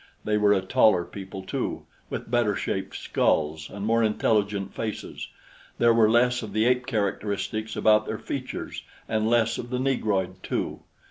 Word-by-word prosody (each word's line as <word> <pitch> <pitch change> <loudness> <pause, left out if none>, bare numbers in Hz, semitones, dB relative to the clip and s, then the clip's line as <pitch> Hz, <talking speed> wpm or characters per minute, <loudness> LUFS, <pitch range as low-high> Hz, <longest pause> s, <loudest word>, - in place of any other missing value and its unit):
They 105 - 0
were 105 -1 +4
a 100 -2 +3
taller 95 -4 +4
people, 95 -1 -8
too, - - -3 0.2
with - - -5
better 120 -4 +2
shaped - - -3
skulls 75 0 0
and 100 0 -6
more 115 +1 +3
intelligent 105 -2 +1
faces. 110 -2 -5 0.5
There 120 0 +5
were 115 -2 +5
less 125 +2 +3
of 105 -3 -7
the 110 +1 +2
ape 125 0 +2
characteristics 110 0 -2
about 110 0 +4
their - - -2
features, - - -5 0.3
and 110 0 0
less 115 -1 +2
of 120 - -6
the 125 - -1
negroid, 100 -8 0
too. - - -3
110 Hz, 160 wpm, -26 LUFS, 100-115 Hz, 0.5 s, There